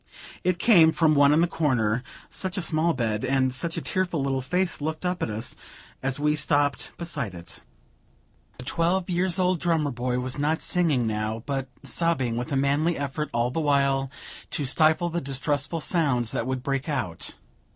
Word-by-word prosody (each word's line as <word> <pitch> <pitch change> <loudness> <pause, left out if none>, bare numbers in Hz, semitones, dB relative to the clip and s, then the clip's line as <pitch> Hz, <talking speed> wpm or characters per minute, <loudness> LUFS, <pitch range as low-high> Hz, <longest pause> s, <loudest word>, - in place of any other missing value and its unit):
It 180 -1 +1
came 175 -5 +6
from 160 -1 +3
one 140 -1 +5
in 155 +2 +4
the 175 - +3
corner 125 -9 +1 0.3
such 185 +1 -4
a 175 -3 0
little 165 +1 +2
bed! 110 -4 -1
and 130 -1 +1
such 165 +6 0
a - - -1
tearful 185 -4 -1
little 135 -1 0
face 180 +6 0
looked 155 +3 -3
up 180 0 -1
at - - -1
us, 110 +1 -3 0.5
as 135 +1 -1
we 150 +1 +2
stopped 145 -1 +1
beside 145 - -4
it! 85 0 -9 1.0
The 125 - -9
twelve 175 +6 0
years 180 0 +1
old 185 -2 +2
drummer 160 -4 +1
boy 125 0 -2
was 125 +2 -3
not 155 +2 +1
singing 155 -9 +1
now, 110 +1 -2
but 135 -2 -2 0.2
sobbing, 150 -9 0
with 125 +6 -4
a - - +1
manly 145 +5 +1
effort 145 +2 -3
all 120 +1 0
the 160 - -1
while 140 -2 +2 0.4
to 145 - -2
stifle 160 +5 +3
the 170 +1 -2
distressful 140 +3 -1
sounds 135 - +1
that 115 - -2
would 130 -1 -2
break 135 +2 -2
out. 120 - -3
145 Hz, 185 wpm, -25 LUFS, 130-165 Hz, 1.0 s, came